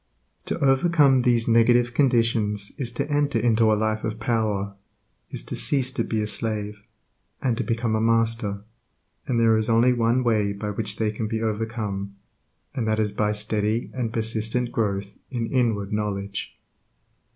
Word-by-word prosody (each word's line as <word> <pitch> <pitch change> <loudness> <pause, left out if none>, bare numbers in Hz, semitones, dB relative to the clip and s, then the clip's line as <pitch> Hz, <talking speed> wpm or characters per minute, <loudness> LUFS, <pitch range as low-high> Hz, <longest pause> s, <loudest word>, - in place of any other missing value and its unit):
To - - -2
overcome 135 -1 +4
these 120 -2 +2
negative 120 +1 +4
conditions 115 -6 +1
is 125 -3 -2
to 140 +4 -2
enter 145 -3 +1
into 115 -1 +3
a - - +4
life 110 0 -1
of 110 0 -3
power, 110 -4 -1 0.6
is - - -6
to - - -6
cease 130 -2 +1
to 135 - -1
be 110 -1 -1
a - - -3
slave, 105 -1 -3 0.6
and 125 -3 0
to - - -1
become 115 -1 -1
a 110 - 0
master, 115 -3 +1 0.6
and 120 -2 +1
there 115 -1 +4
is 110 +1 0
only 115 +2 +4
one 120 +1 +1
way 105 -4 +1
by 105 +1 -4
which 110 +2 -3
they 110 -1 0
can 110 +1 -3
be 110 +1 -2
overcome, 105 -3 -3 0.6
and 115 -4 -2
that 110 0 +1
is 105 -1 +1
by 105 0 0
steady 105 +1 -1
and 120 -3 -2
persistent 115 +2 -1
growth 100 -2 -2
in 120 -3 -2
inward 110 -5 0
knowledge. 100 -2 -3
110 Hz, 165 wpm, -24 LUFS, 105-120 Hz, 0.6 s, overcome